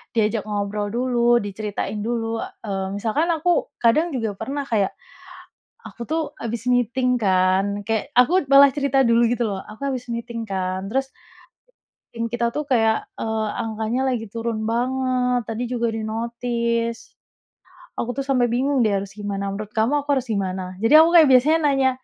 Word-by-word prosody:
diajak 215 -1 0
ngobrol 205 0 -2
dulu, 240 +1 +2
diceritain 205 0 -4
dulu. 225 0 -2
Eee, 195 -3 -5
misalkan 230 +11 0
aku, 335 +2 +1 0.2
kadang 305 +6 +3
juga 225 -4 -1
pernah 285 +1 -3
kayak, 220 -7 0 0.9
aku 235 - -9
tuh 315 -2 -2
habis 230 +1 -4
meeting 250 +1 +1
kan, 195 -1 +1
kayak, 225 +5 -1
aku 345 +9 +5
malah 275 0 +7
cerita 275 -2 +2
dulu 235 0 +4
gitu 240 -1 0
loh, 195 -3 -4
"aku 220 +7 -7
habis 250 -3 -4
meeting 235 0 -4
kan, 190 -1 -3
terus" 270 +2 0 1.1
"tim 230 0 -3
kita 235 0 -1
tuh 300 +4 -3
kayak, 225 -3 +2
eee, 220 -1 -2 0.2
angkanya 220 +2 -2
lagi 225 -2 -3
turun 225 0 -3
banget, 250 +1 0
tadi 225 +2 -3
juga 235 -2 0
di-notice. 235 +1 -2 0.8
Aku 245 - -2
tuh 275 - -2
sampai 250 -3 +2
bingung 265 +2 +1
deh 220 - +3
harus 195 0 -6
gimana, 200 -1 -4
menurut 210 0 -6
kamu 245 +6 +1
aku 290 - -25
harus 260 - -3
gimana?" 190 -3 -3
Jadi 225 +6 +3
aku 325 +1 +6
kayak 320 -3 +8
biasanya 280 +6 +5
nanya, 270 -1 +3
235 Hz, 160 wpm, -22 LUFS, 215-255 Hz, 1.1 s, kayak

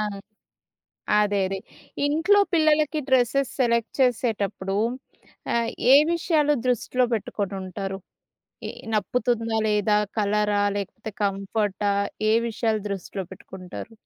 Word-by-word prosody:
ఆ! - - +1 1.2
అదేదే. 200 -2 +1 0.5
ఇంట్లో 325 +8 +3
పిల్లలకి 310 -1 +3
డ్రెస్సెస్ 260 +1 +2
సెలెక్ట్ 235 -2 +2
చేసేటప్పుడు, 215 -6 0 0.8
ఆహ్, 235 -1 +1 0.2
ఏ - - +10 0.2
విషయాలు 315 -3 +2
దృష్టిలో 250 +1 +1
పెట్టుకొని 200 -2 -2
ఉంటారు. 195 +1 -5 0.7
ఈ - - -4 0.2
నప్పుతుందా? 225 +1 0
లేదా? 210 0 +2 0.2
కలరా? 210 0 +1
లేకపోతే, 215 +3 -5
కంఫర్టా? 200 0 0 0.4
ఏ - - +4 0.2
విషయాలు 220 -1 -1
దృష్టిలో 195 0 -5
పెట్టుకుంటారు. 190 +4 -9
220 Hz, 100 wpm, -24 LUFS, 200-250 Hz, 1.2 s, ఏ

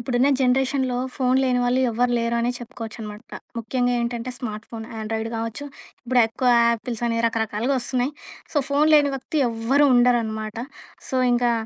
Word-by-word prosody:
ఇప్పుడున్న 245 +2 +1
జనరేషన్‌లో 260 0 +1 0.2
ఫోను 255 -1 +2
లేని 250 -1 +2
వాళ్ళు 245 +1 +2
ఎవరు 245 +2 +1
లేరనే 235 +1 0
చెప్పుకోవచ్చు 235 -2 -8
అనమాట. 210 0 -8 0.4
ముఖ్యంగా 245 +2 0
ఏంటంటే 235 +1 -3
స్మార్ట్ 220 -4 -6
ఫోను 225 -1 -7
ఆండ్రాయిడ్ 220 +1 -3
గావచ్చు 230 +5 -4 0.4
ఇప్పుడు 250 0 +2
ఎక్కువ 230 +3 -1 0.2
'యాపిల్స్' 235 0 -2
అనేవి 230 0 0
రకరకాలుగా 225 +3 -1
ఒస్తున్నాయి. 255 +3 -1 0.4
సో, - - -3
ఫోను 290 +2 +3
లేని 290 -2 +4
వ్యక్తి 270 +4 -4
ఎవ్వరు 240 +6 +2
ఉండరనమాట. 225 -3 +1 0.5
సో, 260 - -1 0.2
ఇంకా 240 0 +2
240 Hz, 150 wpm, -23 LUFS, 225-255 Hz, 0.5 s, లేని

